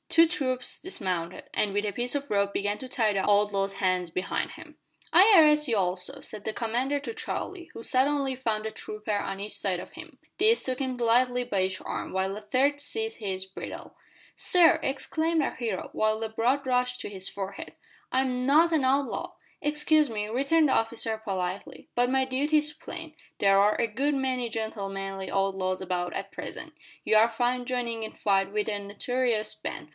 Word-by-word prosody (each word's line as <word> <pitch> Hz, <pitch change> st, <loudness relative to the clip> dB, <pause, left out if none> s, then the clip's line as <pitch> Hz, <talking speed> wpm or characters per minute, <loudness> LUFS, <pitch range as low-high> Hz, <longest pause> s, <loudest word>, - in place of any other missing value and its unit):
Two 330 Hz, 0 st, +6 dB
troopers 260 Hz, -7 st, -2 dB
dismounted, 185 Hz, -, -3 dB
and 210 Hz, -, +1 dB
with 205 Hz, +1 st, 0 dB
a 205 Hz, -, -2 dB
piece 245 Hz, +5 st, -1 dB
of 285 Hz, 0 st, -3 dB
rope 200 Hz, -1 st, +1 dB
began 205 Hz, +1 st, -1 dB
to 260 Hz, -, -8 dB
tie 220 Hz, -4 st, +2 dB
the 195 Hz, -, 0 dB
outlaw's 200 Hz, -1 st, +2 dB
hands 185 Hz, -2 st, 0 dB
behind 180 Hz, +3 st, -2 dB
him. -, -, -12 dB, 0.4 s
"I 390 Hz, +6 st, +8 dB
arrest 300 Hz, -2 st, +5 dB
you 225 Hz, -, +2 dB
also," 180 Hz, -1 st, 0 dB
said 210 Hz, -1 st, -8 dB
the 220 Hz, -, -2 dB
commander 245 Hz, +6 st, -1 dB
to 290 Hz, -, -6 dB
Charlie, 385 Hz, -5 st, -5 dB
who -, -, -8 dB
suddenly 270 Hz, +2 st, +1 dB
found 220 Hz, -4 st, -2 dB
a 220 Hz, -, -2 dB
trooper 215 Hz, 0 st, -5 dB
on 195 Hz, -1 st, -3 dB
each 205 Hz, +1 st, -4 dB
side 185 Hz, -3 st, 0 dB
of -, -, -10 dB
him. -, -, -11 dB, 0.2 s
These 445 Hz, +3 st, +3 dB
took 255 Hz, -1 st, -2 dB
him 260 Hz, -2 st, -2 dB
lightly 245 Hz, +1 st, +2 dB
by 200 Hz, -6 st, 0 dB
each 185 Hz, 0 st, 0 dB
arm, -, -, -4 dB
while 190 Hz, +1 st, -1 dB
a 210 Hz, -, -7 dB
third 275 Hz, +7 st, +1 dB
seized 445 Hz, +8 st, -4 dB
his 190 Hz, -3 st, -3 dB
bridle. 190 Hz, -, -8 dB, 0.4 s
"Sir!" 355 Hz, -2 st, +5 dB
exclaimed 320 Hz, +4 st, 0 dB
our -, -, -2 dB
hero, 225 Hz, -7 st, -3 dB
while 215 Hz, 0 st, +1 dB
the 225 Hz, -, -2 dB
blood 245 Hz, +5 st, 0 dB
rushed 250 Hz, 0 st, +1 dB
to -, -, -5 dB
his 190 Hz, -2 st, -3 dB
forehead, 195 Hz, 0 st, -6 dB, 0.4 s
"I 260 Hz, -, +2 dB
am 250 Hz, -1 st, -1 dB
not 320 Hz, +5 st, +5 dB
an 305 Hz, -4 st, +3 dB
outlaw!" 270 Hz, +1 st, 0 dB, 0.3 s
"Excuse 300 Hz, 0 st, +2 dB
me," 210 Hz, -2 st, -3 dB
returned 280 Hz, +7 st, +3 dB
the 265 Hz, -, +2 dB
officer 225 Hz, -1 st, 0 dB
politely, 185 Hz, -1 st, -4 dB
"but 245 Hz, 0 st, +3 dB
my 265 Hz, 0 st, +2 dB
duty 280 Hz, +4 st, +1 dB
is 300 Hz, 0 st, +1 dB
plain. 320 Hz, 0 st, -9 dB, 0.2 s
There 195 Hz, 0 st, +5 dB
are 205 Hz, +1 st, +4 dB
a -, -, +2 dB
good 275 Hz, +7 st, 0 dB
many 255 Hz, -3 st, -1 dB
gentlemanly 195 Hz, -3 st, -4 dB
outlaws 190 Hz, -1 st, 0 dB
about 180 Hz, -1 st, -2 dB
at 195 Hz, +2 st, -5 dB
present. -, -, -7 dB, 0.3 s
You -, -, +3 dB
are 220 Hz, +2 st, +6 dB
found 245 Hz, +2 st, 0 dB
joining 235 Hz, -3 st, -2 dB
in 220 Hz, -, -5 dB
fight 195 Hz, -2 st, +1 dB
with 210 Hz, 0 st, -1 dB
a 210 Hz, -2 st, -1 dB
notorious 215 Hz, +2 st, -1 dB
band. 160 Hz, -, -6 dB
230 Hz, 190 wpm, -28 LUFS, 200-270 Hz, 0.4 s, I